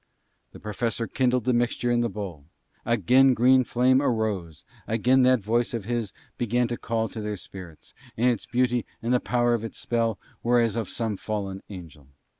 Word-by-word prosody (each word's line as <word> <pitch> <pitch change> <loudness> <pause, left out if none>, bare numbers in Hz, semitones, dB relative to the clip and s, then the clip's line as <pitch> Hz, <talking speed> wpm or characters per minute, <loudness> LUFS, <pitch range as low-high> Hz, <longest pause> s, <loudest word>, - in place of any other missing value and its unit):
The - - -12
Professor 115 +2 -2
kindled 125 0 +1
the 125 +2 +1
mixture 120 0 0
in 120 0 +2
the 120 - 0
bowl; 95 -8 -7 0.4
again 125 +4 +4
green 130 +2 +5
flame 130 +2 +3
arose, 110 - -2 0.2
again 125 +4 +3
that 130 -2 +4
voice 120 +4 0
of 110 -5 -4
his 115 -3 -2 0.3
began 120 +1 +1
to 120 - -3
call 115 -1 -1
to 110 - -7
their 105 -1 -3
spirits, 90 -4 -11 0.2
and 115 - +1
its 115 - -4
beauty 125 -1 +1 0.2
and 120 +2 +1
the 125 - +4
power 120 -1 +1
of 115 -2 -1
its 115 - -6
spell 115 -2 0 0.2
were 120 +1 +3
as 115 -2 +1
of 115 -5 -3
some 110 -4 -3
fallen 100 -2 -4
angel. 80 -8 -11
115 Hz, 185 wpm, -26 LUFS, 105-120 Hz, 0.4 s, green